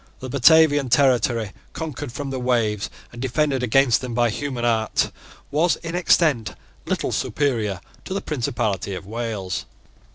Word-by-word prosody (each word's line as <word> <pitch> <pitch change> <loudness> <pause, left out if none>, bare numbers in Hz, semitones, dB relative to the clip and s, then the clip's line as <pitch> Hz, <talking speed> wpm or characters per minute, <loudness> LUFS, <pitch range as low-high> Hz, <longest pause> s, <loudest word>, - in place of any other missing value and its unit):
The 130 - -7
Batavian 145 +1 +5
territory, 120 -4 +2 0.2
conquered 150 -4 -5
from 140 +2 -5
the 130 - -3
waves 115 -5 0 0.2
and 120 - -8
defended 135 +1 0
against 125 0 +3
them 125 -3 -5
by 120 -1 +2
human 130 -1 -3
art, 110 -2 +1 0.4
was 160 +4 +3
in 165 0 -5
extent 160 -8 +2 0.3
little - - -1
superior 115 -10 -1 0.3
to 190 - -4
the - - 0
principality 115 - -2
of 90 - -8
Wales. 105 -3 -4
125 Hz, 140 wpm, -22 LUFS, 115-145 Hz, 0.4 s, Batavian